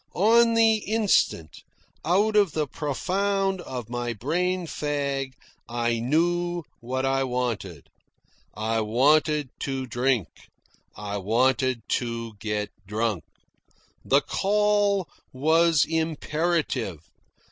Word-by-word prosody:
On 230 +4 +4
the 225 -1 +5
instant, 210 - 0 0.4
out 205 +6 +2
of 200 -7 +4
the 155 -1 0
profound 190 +7 -1
of 125 -8 -6
my 120 0 -3
brain 175 - -1
fag, 140 -3 -2 0.4
I 120 -1 0
knew 175 +6 0 0.2
what 130 +3 -3
I 135 0 +1
wanted. 120 - -3 0.7
I 110 +1 -1
wanted 145 +6 +2
to 135 -1 -3
drink. 120 - 0 0.7
I 105 -1 -5
wanted 125 +4 +1 0.2
to 115 -2 -5
get 105 -1 -2 0.2
drunk. 105 -4 -1 0.8
The - - +3
call 205 -2 +1 0.2
was 160 +3 +3
imperative. 160 - -1
140 Hz, 100 wpm, -25 LUFS, 120-175 Hz, 0.8 s, the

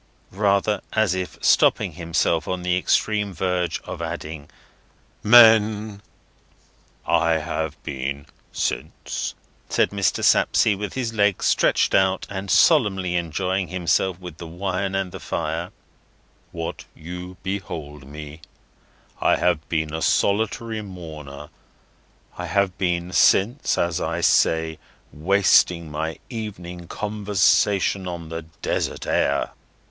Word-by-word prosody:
—rather 100 +1 +1
as 110 -4 +2
if 95 -1 -4
stopping - - +4
himself 85 -1 0
on 90 -1 -3
the 90 0 +1
extreme 105 +2 +1
verge 90 -2 -1
of - - -7
adding—"men!" 105 +7 +2 1.0
"I 85 0 +2
have 80 -1 -2
been 70 +1 -4 0.3
since," - - -3 0.3
says - - +2
Mr. 100 -1 0
Sapsea, 105 - +4
with 100 -1 -5
his 120 -3 -2
legs 105 -3 +1
stretched - - +2
out, 95 -1 +2
and 95 0 -5
solemnly 95 +1 +3
enjoying 90 +3 -1
himself 90 +1 0
with 90 -3 -9
the 85 - -8
wine 95 +3 -3
and 95 -2 -2
the - - -8
fire, 80 +2 -3 0.8
"what 80 -1 -6
you 90 +3 -8
behold 80 -8 -5
me; 75 +2 -9 0.8
I - - +4
have 85 -3 0
been 80 -2 -1
since 80 +2 -4
a - - +4
solitary 110 +2 0
mourner; 75 -7 -9 0.9
I 90 - -4
have 95 +1 +1
been 90 -1 -1
since, 105 - +3
as 85 -1 0
I - - -2
say, 80 -1 +2 0.3
wasting 85 -1 +3
my 80 +2 -3
evening 90 -7 -7
conversation 100 -2 +1
on 85 -2 -6
the 80 0 -5 0.2
desert - - -2
air. - - +1
90 Hz, 120 wpm, -23 LUFS, 80-100 Hz, 1.0 s, stopping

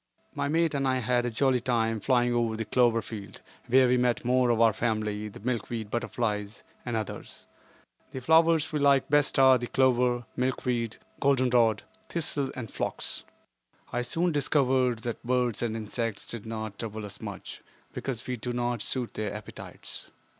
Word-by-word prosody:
My - - -1
mate 165 +1 +2
and 135 -1 0
I 130 0 +2
had 125 0 +1
a - - 0
jolly 130 +2 +2
time 115 -2 0
flying 120 +2 +2
over 115 -2 +1
the 115 - -3
clover 115 0 +3
field, 105 -4 -8 0.3
where 130 +1 +5
we 125 +1 +3
met 125 -1 +1
more 125 0 +3
of 115 -1 +2
our 115 -2 +5
family, 105 -2 -1
the 105 - -10
milkweed 115 -2 -3
butterflies, 105 -3 -2 0.2
and 120 -2 -3
others. 110 -2 -6 0.6
The 130 - -6
flowers 160 +3 +4
we 150 - +1
like 140 -2 +4
best 145 -1 +3
are 130 -1 +7
the 120 - -4
clover, 125 -2 +2
milkweed, 125 -3 -1 0.2
goldenrod, 125 -5 +3 0.3
thistle 150 -4 0
and 120 -4 -6
phlox. - - -3 0.7
I 120 - 0
soon 165 +8 0
discovered 130 -5 +2
that 120 -1 -4
birds 125 -2 0
and 115 -2 -1
insects 115 0 -3
did 115 -2 -7
not 110 -2 -5
trouble 110 -2 -5
us 100 - -9
much, - - -7 0.3
because 125 -3 -4
we 125 -1 -3
do 120 +2 -4
not 120 -2 -1
suit 125 0 -2
their 110 -1 -3
appetites. 105 0 -9
120 Hz, 170 wpm, -28 LUFS, 115-130 Hz, 0.7 s, are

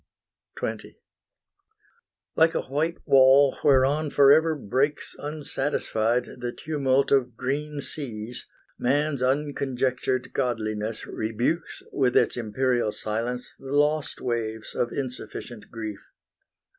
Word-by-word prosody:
XX - - -5 1.4
Like 160 0 +4
a - - 0
white 155 +5 -1
wall 135 +1 +6
whereon 145 +2 +4
forever 150 +4 +5
breaks 140 +3 -1
Unsatisfied 135 -5 -1
the 120 0 -3
tumult 140 -2 0
of 125 -4 +2
green 145 +3 -2
seas, 120 -6 -6 0.3
Man's 140 +2 +1
unconjectured 130 -2 0
godliness 110 -4 -2
rebukes 120 +10 -2
With 130 -3 +2
its - - +3
imperial 120 0 0
silence 115 +4 -3
the 135 0 -7
lost 150 +1 +1
waves 110 -3 -3
Of 120 - -1
insufficient 125 -3 -6
grief. 110 -3 -6
130 Hz, 100 wpm, -26 LUFS, 120-145 Hz, 1.4 s, wall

